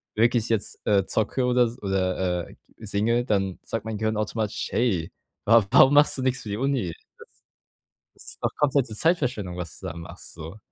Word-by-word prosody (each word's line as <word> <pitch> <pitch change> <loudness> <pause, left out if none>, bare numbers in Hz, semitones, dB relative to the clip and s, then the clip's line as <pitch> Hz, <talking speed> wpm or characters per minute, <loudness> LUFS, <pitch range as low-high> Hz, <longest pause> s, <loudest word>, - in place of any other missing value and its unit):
wirklich 115 0 +2
jetzt, 110 -3 0
äh, 100 -3 +3
zocke 110 +5 0
oder 125 0 +3
s 120 +2 -6
oder, 95 -2 -1
äh, - - -15 0.2
singe, 110 +3 0
dann 95 -5 -1
sagt 115 -1 -4
mein 110 -2 -4
Gehirn 110 0 -1
automatisch: 110 0 -2
„Hey, 95 -9 0 0.3
wa 115 +1 +6
warum 135 +6 +6
machst 145 0 +5
du 130 - -3
nichts 130 0 0
für 110 - -8
die 100 - -3
Uni? 135 -5 0
Das - - -16 1.1
das - - -16
ist - - -18
doch - - +1
komplette 135 -6 +1
Zeitverschwendung, 125 - 0
was 85 -4 -7
du - - -7
da 80 - -6
machst“, 85 - -10
so. 80 +5 -9
110 Hz, 190 wpm, -25 LUFS, 95-125 Hz, 1.1 s, wa